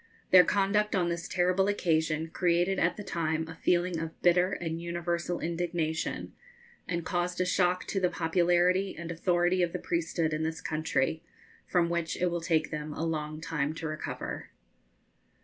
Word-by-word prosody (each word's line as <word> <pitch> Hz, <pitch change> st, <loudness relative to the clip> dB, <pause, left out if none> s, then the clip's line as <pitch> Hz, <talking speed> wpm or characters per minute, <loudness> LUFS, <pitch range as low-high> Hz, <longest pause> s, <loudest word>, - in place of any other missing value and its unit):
Their 185 Hz, -1 st, +9 dB
conduct 205 Hz, +2 st, +1 dB
on 175 Hz, -2 st, +2 dB
this 170 Hz, 0 st, -3 dB
terrible 180 Hz, +2 st, +2 dB
occasion 160 Hz, -5 st, +1 dB
created 175 Hz, +2 st, +1 dB
at 175 Hz, +1 st, +1 dB
the 210 Hz, -, -6 dB
time 160 Hz, -3 st, -1 dB
a 165 Hz, -, -7 dB
feeling 175 Hz, +1 st, +1 dB
of 165 Hz, 0 st, -6 dB
bitter 180 Hz, +1 st, +4 dB
and 165 Hz, -1 st, -3 dB
universal 170 Hz, 0 st, -2 dB
indignation, 165 Hz, -1 st, -2 dB, 0.5 s
and 170 Hz, -2 st, -2 dB
caused 180 Hz, -1 st, -1 dB
a 185 Hz, -, +2 dB
shock 180 Hz, 0 st, +1 dB
to 195 Hz, -, -1 dB
the 180 Hz, -1 st, +2 dB
popularity 175 Hz, +3 st, +2 dB
and 170 Hz, 0 st, -5 dB
authority 175 Hz, +1 st, +2 dB
of 175 Hz, -1 st, 0 dB
the -, -, -1 dB
priesthood 165 Hz, -1 st, -1 dB
in 155 Hz, -, -1 dB
this 160 Hz, +1 st, -2 dB
country, 155 Hz, -2 st, -1 dB, 0.5 s
from 175 Hz, -2 st, +2 dB
which 170 Hz, -1 st, -2 dB
it 180 Hz, -1 st, +1 dB
will 170 Hz, 0 st, -2 dB
take 160 Hz, -2 st, +1 dB
them 150 Hz, 0 st, -4 dB
a 165 Hz, -, -2 dB
long 155 Hz, -1 st, -3 dB
time 155 Hz, -2 st, -2 dB
to 160 Hz, -, -4 dB
recover. 155 Hz, 0 st, -5 dB
170 Hz, 165 wpm, -29 LUFS, 160-180 Hz, 0.5 s, Their